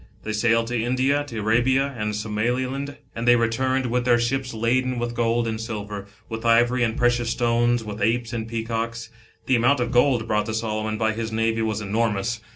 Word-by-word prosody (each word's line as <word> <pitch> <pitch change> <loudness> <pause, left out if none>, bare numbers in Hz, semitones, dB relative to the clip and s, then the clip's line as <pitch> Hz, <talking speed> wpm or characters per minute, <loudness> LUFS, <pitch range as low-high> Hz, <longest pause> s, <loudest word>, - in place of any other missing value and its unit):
They 110 - -3
sailed 115 +2 +2
to 120 -2 -1
India, 130 +4 +1
to 120 -6 -8
Arabia 130 +6 +2
and 105 -2 -2
Somaliland, 125 +6 -2 0.2
and 115 +1 -3
they 120 - +7
returned 130 +3 +1
with 125 0 0
their 120 -1 +4
ships 125 +2 -1
laden 125 +3 0
with 120 0 -2
gold 115 0 +1
and 110 0 -3
silver, 105 -3 -5 0.2
with 110 -1 -6
ivory 120 +2 +3
and 115 -1 0
precious 120 -1 +2
stones, 120 0 +1
with 105 -1 -7
apes 115 +2 0
and 110 -2 -3
peacocks. 115 0 -3 0.3
The 130 - +3
amount 125 +4 +3
of 120 -1 -1
gold 125 -2 +3
brought 105 -1 0
to 110 - -2
Solomon 110 -1 -2
by 110 0 +1
his 110 0 -4
navy 115 0 0
was 110 -1 -1
enormous. 110 +2 -1
115 Hz, 190 wpm, -23 LUFS, 110-120 Hz, 0.3 s, they